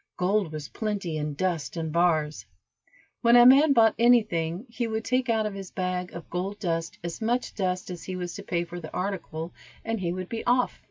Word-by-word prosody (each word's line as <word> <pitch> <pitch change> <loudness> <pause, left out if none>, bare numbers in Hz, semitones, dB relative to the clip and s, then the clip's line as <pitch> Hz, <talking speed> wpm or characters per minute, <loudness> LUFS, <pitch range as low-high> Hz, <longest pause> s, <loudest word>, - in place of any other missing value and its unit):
Gold 190 -1 +1
was 155 -2 -6
plenty 205 -7 -3
in 150 -1 -3
dust 170 -1 -2
and 160 -1 -2
bars. 160 -3 +1 0.7
When 235 0 +5
a 240 0 +9
man 280 +4 +7
bought 225 -4 +5
any 240 0 +6
thing 170 +1 -3
he 235 0 -3
would 220 0 -3
take 255 +1 +1
out 220 -1 +2
of 210 - -2
his 195 -2 -7
bag 180 -1 -3
of 170 - -8
gold 190 +3 -3
dust 165 -4 -2
as 170 +3 -5
much 240 +3 0
dust 185 -2 -2
as 175 - -7
he 185 - -4
was 175 -1 -4
to 200 - -7
pay 175 -3 -1
for 175 +1 -7
the 160 -2 -9
article, 180 -4 -4 0.3
and 225 -1 -1
he 175 -2 -1
would 185 0 -4
be 225 +2 -4
off. 250 +1 +2
185 Hz, 215 wpm, -27 LUFS, 170-225 Hz, 0.7 s, a